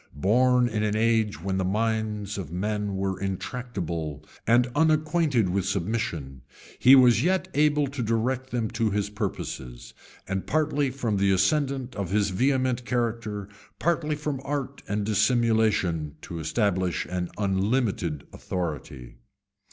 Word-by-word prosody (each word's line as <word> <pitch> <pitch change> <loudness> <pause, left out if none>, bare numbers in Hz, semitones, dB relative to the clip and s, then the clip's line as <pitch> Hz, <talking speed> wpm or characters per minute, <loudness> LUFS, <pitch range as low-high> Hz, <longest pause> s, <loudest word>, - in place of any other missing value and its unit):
Born 125 - +3
in 110 -2 -2
an 105 0 0
age 110 -4 +1
when 95 -1 -1
the - - +1
minds 105 0 -1
of 85 -5 -6
men 105 +2 -2
were 95 -1 -2
intractable, 90 - -4 0.2
and 120 +1 +5
unacquainted 155 - +2
with 95 +1 0
submission, 85 - -2 0.4
he 130 +2 +8
was 125 -3 +6
yet 185 +1 +1
able 150 0 +3
to 140 -1 -5
direct 120 +3 -1
them 115 -4 -2
to 115 -1 0
his 105 0 -1
purposes, 65 - -5 0.3
and, 95 0 -3
partly 145 -2 +1
from 120 -5 -2
the 100 0 +2
ascendant 130 +6 +1
of 100 -4 -3
his 100 0 +1
vehement 130 +3 +1
character, 115 -4 -2 0.3
partly 155 -2 0
from 150 -3 -3
art 140 -1 -3
and 105 0 -1
dissimulation, 110 - +2
to 85 - -6
establish 95 +1 0
an 90 -1 -3
unlimited 100 - 0
authority. 75 -9 -5
110 Hz, 135 wpm, -26 LUFS, 95-130 Hz, 0.4 s, he